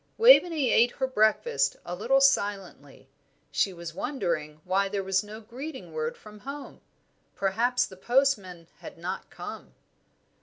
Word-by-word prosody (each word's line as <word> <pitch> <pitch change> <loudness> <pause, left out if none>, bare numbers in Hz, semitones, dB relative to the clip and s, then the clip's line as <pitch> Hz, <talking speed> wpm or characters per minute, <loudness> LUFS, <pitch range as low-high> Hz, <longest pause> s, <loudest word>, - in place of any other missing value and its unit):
Waveney 350 - +6
ate 240 +1 +4
her 265 - -1
breakfast 215 - +2
a 175 - -5
little 235 +9 +2
silently; 195 - 0 0.4
she 170 +7 +1
was 170 -2 -8
wondering 165 - -3
why 195 +2 +1
there 200 -1 -2
was 190 0 +1
no 210 +1 -9
greeting 260 +6 -9
word 470 0 -3
from 210 -1 -14
home. 280 +4 -9 0.5
Perhaps 240 +6 +1
the 190 - -13
postman 205 -8 +1
had - - -10
not 180 +3 -5
come. - - -9
210 Hz, 140 wpm, -27 LUFS, 185-265 Hz, 0.5 s, Waveney